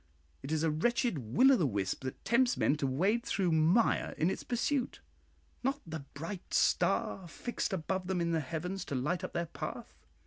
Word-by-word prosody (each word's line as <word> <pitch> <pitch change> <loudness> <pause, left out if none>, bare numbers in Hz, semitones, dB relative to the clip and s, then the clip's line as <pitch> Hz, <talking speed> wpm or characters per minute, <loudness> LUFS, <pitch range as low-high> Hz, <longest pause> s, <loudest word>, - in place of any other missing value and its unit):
It 135 - -6
is 160 0 +1
a 160 - +2
wretched 235 - +1
Will 130 - +4
o' - - +7
the 175 - +2
wisp 100 0 -2
that 130 - -6
tempts 245 +1 +3
men 145 - +3
to 140 - 0
wade 195 - +1
through 190 -8 0
mire 160 +8 +3
in 165 +4 +2
its - - -4
pursuit, 250 +2 -1 0.6
not 270 +3 0
the 160 -1 -5 0.2
bright 165 +6 -5
star 185 -3 +2
fixed 240 +7 -3
above 185 +1 -2
them 190 -1 0
in 170 0 0
the 165 - +2
heavens 170 +6 -4
to 140 - -4
light 160 +8 -1
up 185 - -5
their 170 0 -1
path. - - -7
175 Hz, 195 wpm, -32 LUFS, 155-230 Hz, 0.6 s, o